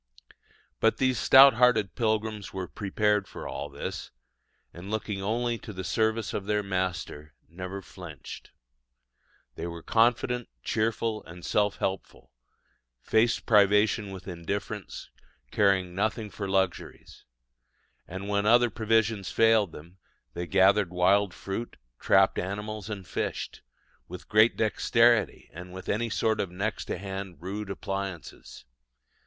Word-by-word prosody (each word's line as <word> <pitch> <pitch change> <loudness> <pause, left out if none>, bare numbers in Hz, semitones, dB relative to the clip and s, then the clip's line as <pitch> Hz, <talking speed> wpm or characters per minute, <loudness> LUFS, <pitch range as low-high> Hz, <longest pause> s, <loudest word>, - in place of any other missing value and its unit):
But 110 - +3
these 130 -4 +1
stout 135 +6 +8
hearted 115 -4 +3
pilgrims 110 -2 -1
were 95 -1 -5
prepared 105 0 0
for - - -8
all 70 +1 -5
this, 70 0 -6 0.6
and 90 +3 -9
looking 105 -2 -3
only 115 +3 -1
to - - -9
the 95 -2 -6
service 110 +5 0
of 100 - -3
their 105 0 +1
Master, 90 -6 -3
never 90 +3 -7
flinched. 85 -6 -10 1.0
They 85 - -5
were 85 -1 -8
confident, 120 +1 +1
cheerful, 110 0 -1
and 85 +1 -11
self 105 -1 +1
helpful, 95 0 -4 0.7
faced 110 - +1
privation 105 0 +4
with 95 -1 -9
indifference, 100 +4 -5 0.4
caring 95 -3 +2
nothing 110 +2 -2
for 100 +2 -5
luxuries; 95 -2 -2 0.8
and 95 +2 -6
when 100 0 0
other 120 +1 +5
provisions 110 -2 +1
failed 110 -5 +3
them, 85 +5 -13 0.3
they 85 +4 -5
gathered 95 +1 +4
wild 95 +2 +3
fruit, 100 +3 -6 0.2
trapped - - +3
animals, 105 +3 -5
and 100 -3 -6
fished, - - -4 0.5
with 90 0 -10
great 110 +2 +4
dexterity 115 +1 +2
and 90 +3 -9
with 95 0 -9
any 115 +3 0
sort 110 0 0
of 95 - -1
next 100 +4 -3
to - - -3
hand 95 -2 -6
rude 100 +4 -5
appliances. 95 -10 -6
100 Hz, 130 wpm, -27 LUFS, 95-110 Hz, 1.0 s, stout